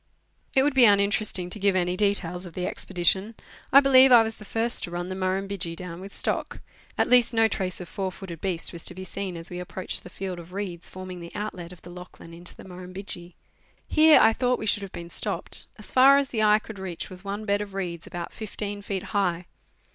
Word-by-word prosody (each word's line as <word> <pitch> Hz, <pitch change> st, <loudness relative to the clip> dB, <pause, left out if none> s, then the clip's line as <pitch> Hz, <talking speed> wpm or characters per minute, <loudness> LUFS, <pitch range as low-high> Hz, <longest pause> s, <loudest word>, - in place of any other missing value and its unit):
It 265 Hz, -, +5 dB
would 290 Hz, 0 st, +2 dB
be 260 Hz, -2 st, +7 dB
uninteresting 200 Hz, -3 st, +2 dB
to 210 Hz, -, -2 dB
give 200 Hz, -1 st, +2 dB
any 180 Hz, -1 st, +1 dB
detail 200 Hz, -3 st, 0 dB
of 175 Hz, -2 st, -10 dB
the 180 Hz, -, -2 dB
expedition. 190 Hz, +6 st, 0 dB, 0.4 s
I 275 Hz, -, +9 dB
believe 265 Hz, -1 st, +7 dB
I 235 Hz, -2 st, +9 dB
was 220 Hz, 0 st, -4 dB
the 210 Hz, -, -12 dB
first 230 Hz, +3 st, 0 dB
to -, -, -3 dB
run 175 Hz, +1 st, -4 dB
the 185 Hz, -, -4 dB
Murrumbidgee 190 Hz, -2 st, -2 dB
down 180 Hz, 0 st, -8 dB
with 195 Hz, +1 st, -9 dB
stock, -, -, -2 dB, 0.4 s
at -, -, +2 dB
least 245 Hz, -1 st, +4 dB
no 225 Hz, 0 st, +5 dB
trace 190 Hz, -4 st, -3 dB
of 180 Hz, -, -7 dB
four 190 Hz, +1 st, -3 dB
footed 175 Hz, -3 st, -9 dB
beast 185 Hz, -3 st, +1 dB
was 170 Hz, -, -3 dB
to 180 Hz, -, +4 dB
be 185 Hz, -, -7 dB
seen 185 Hz, -1 st, -5 dB
as 165 Hz, +1 st, -7 dB
we 180 Hz, -, -5 dB
approached 180 Hz, +1 st, -4 dB
the -, -, -11 dB
field 185 Hz, -1 st, -5 dB
of 170 Hz, +1 st, -12 dB
reeds 185 Hz, -4 st, -4 dB
forming 185 Hz, -1 st, -8 dB
the 170 Hz, 0 st, -10 dB
outlet 185 Hz, -5 st, -5 dB
of 180 Hz, -, -14 dB
the 175 Hz, -, -11 dB
Lachlan 180 Hz, -1 st, -12 dB
into 175 Hz, +1 st, -9 dB
the -, -, -12 dB
Murrumbidgee. 180 Hz, -1 st, -8 dB, 0.5 s
Here 310 Hz, 0 st, +6 dB
I 225 Hz, -, +6 dB
thought 250 Hz, +1 st, +1 dB
we -, -, -5 dB
should 205 Hz, -1 st, +2 dB
have 195 Hz, -2 st, -7 dB
been 170 Hz, 0 st, -8 dB
stopped. -, -, -2 dB
As 215 Hz, -, -4 dB
far 270 Hz, +2 st, +7 dB
as 280 Hz, -1 st, 0 dB
the 225 Hz, -5 st, -1 dB
eye 210 Hz, 0 st, +5 dB
could 215 Hz, -1 st, -9 dB
reach 185 Hz, -2 st, -6 dB
was 185 Hz, 0 st, -10 dB
one 205 Hz, +2 st, -5 dB
bed 200 Hz, 0 st, +1 dB
of 200 Hz, -2 st, -7 dB
reeds 175 Hz, -4 st, -4 dB
about 175 Hz, -1 st, -6 dB
15 205 Hz, -1 st, -5 dB
feet 195 Hz, -2 st, -4 dB
high. 180 Hz, -4 st, -1 dB
190 Hz, 230 wpm, -26 LUFS, 180-215 Hz, 0.5 s, I